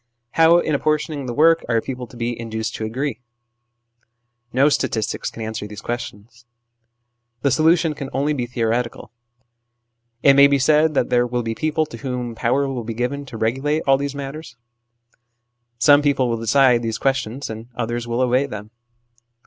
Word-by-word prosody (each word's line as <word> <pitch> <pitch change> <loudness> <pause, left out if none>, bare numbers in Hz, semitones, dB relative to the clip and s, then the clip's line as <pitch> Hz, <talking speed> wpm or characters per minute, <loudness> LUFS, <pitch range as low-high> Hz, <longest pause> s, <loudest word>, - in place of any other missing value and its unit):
How, 165 +1 +5
in 155 -3 0
apportioning 150 -1 -1
the 120 - -3
work, 165 +2 +4
are 115 -1 +3
people 125 +1 -6
to 120 - -14
be 120 0 -2
induced 110 0 -4
to 110 - -4
agree? 125 +2 -3 1.3
No 135 +3 +4
statistics 110 -7 -1
can 115 - -8
answer 110 -1 -5
these 105 0 -9
questions. 120 0 -7 1.0
The 140 - +3
solution 160 +3 +3
can 140 -2 -7
only 145 +3 0
be 125 -4 -3
theoretical: 120 0 -2 1.1
it 140 - +7
may 140 +1 +7
be 140 0 +2
said 155 +3 +3
that 125 - +1
there 120 0 +3
will 120 0 -2
be 115 0 -2
people 155 +4 0
to 115 - -10
whom 125 -1 -4
power 130 +5 0
will 130 -3 -4
be 115 0 -5
given 140 +4 -3
to 125 -3 -8
regulate 135 +8 0
all 135 0 +4
these 140 0 -3
matters. 140 -2 -7 1.2
Some 145 +4 +6
people 140 -3 +1
will 115 - -1
decide 125 +1 +4
these 115 -1 -2
questions, 135 0 -1
and 110 +1 -8
others 120 +1 -3
will 120 +1 -1
obey 130 +2 +2
them. 105 -3 -8
125 Hz, 170 wpm, -21 LUFS, 115-140 Hz, 1.3 s, it